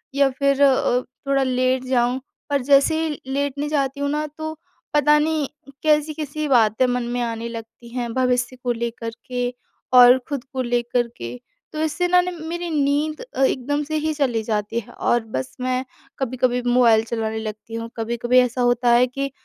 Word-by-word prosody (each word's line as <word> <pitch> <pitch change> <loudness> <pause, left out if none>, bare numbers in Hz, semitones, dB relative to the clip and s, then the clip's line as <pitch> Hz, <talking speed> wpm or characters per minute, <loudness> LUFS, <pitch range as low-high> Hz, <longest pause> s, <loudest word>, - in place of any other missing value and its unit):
या 280 -1 +4
फिर 275 +1 +1
अ, 255 -2 +3 0.3
थोड़ा 275 -1 +2
लेट 255 0 +1
जाऊँ, 250 0 +1 0.3
पर 280 -2 +1
जैसे 285 +4 +4
ही 300 - -4
लेटने 285 +1 -1
जाती 280 -2 -1
हूँ 285 0 0
ना, 300 +1 -1
तो 315 +1 -7 0.4
पता 295 +1 +5
नहीं, 305 -1 0 0.4
कैसी-कैसी 305 0 0
बातें 235 -2 +4
मन 245 0 0
में 245 - -1
आने 230 -1 -3
लगती 230 +1 -10
हैं, 240 -1 -4
भविष्य 250 0 +1
को 245 - +1
लेकर 235 0 -3 0.2
के 245 -1 -2 0.4
और 250 0 +9
खुद 280 -3 -3
को 260 - -1
लेकर 240 0 0
के। 115 +1 -6 0.4
तो 305 - -4
इससे 325 +3 0
ना, 360 0 +5
ने 360 0 -3
मेरी 340 +1 -5
नींद 300 - 0
अ, - - -6
एकदम 290 +3 0
से 310 +2 -4
ही 310 0 -1
चली 255 -6 0
जाती 215 +1 -1
है 220 - -12
और 240 -1 +1
बस 130 0 -4
मैं 255 0 0 0.4
कभी-कभी 250 -1 0
मोबाइल 235 -3 +5
चलाने 220 -1 -2
लगती 220 +1 -7
हूँ, 230 0 -5
कभी-कभी 235 +2 +2
ऐसा 250 0 +1
होता 245 0 +2
है 245 +1 +5
कि 275 +2 -4
255 Hz, 180 wpm, -22 LUFS, 240-290 Hz, 0.4 s, और